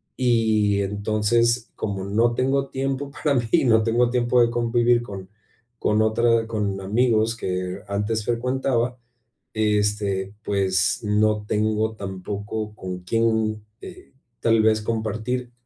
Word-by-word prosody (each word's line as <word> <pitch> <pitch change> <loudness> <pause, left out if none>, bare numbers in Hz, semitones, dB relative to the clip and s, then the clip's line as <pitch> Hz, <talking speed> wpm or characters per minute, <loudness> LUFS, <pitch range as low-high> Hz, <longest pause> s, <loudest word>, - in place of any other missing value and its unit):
Y 110 -5 +2
entonces, 110 +4 +1
como 100 -3 -3
no 115 +4 +1
tengo 135 +2 0
tiempo 135 +1 -3
para 145 -1 0
mí 120 - -3
y 165 - +3
no 110 -2 +4
tengo 120 +2 +2
tiempo 125 0 +2
de 115 - +4
convivir 120 0 +2
con 95 -4 -8 0.5
con 105 +1 +2
otra 115 +1 +2
con 100 -3 -2
amigos 110 +2 +1
que 90 -2 -3
antes 105 +2 -2
frecuentaba, 125 0 0 0.6
este, 105 -2 0
pues 95 -2 +1
no 105 0 +1
tengo 110 +1 0
tampoco 100 +3 -5
con 90 -3 -6
quién, 110 +1 0 0.2
eh, 185 - -12 0.3
tal 115 -1 +3
vez 110 0 +3
compartir, 115 +3 -3
110 Hz, 125 wpm, -23 LUFS, 105-120 Hz, 0.6 s, no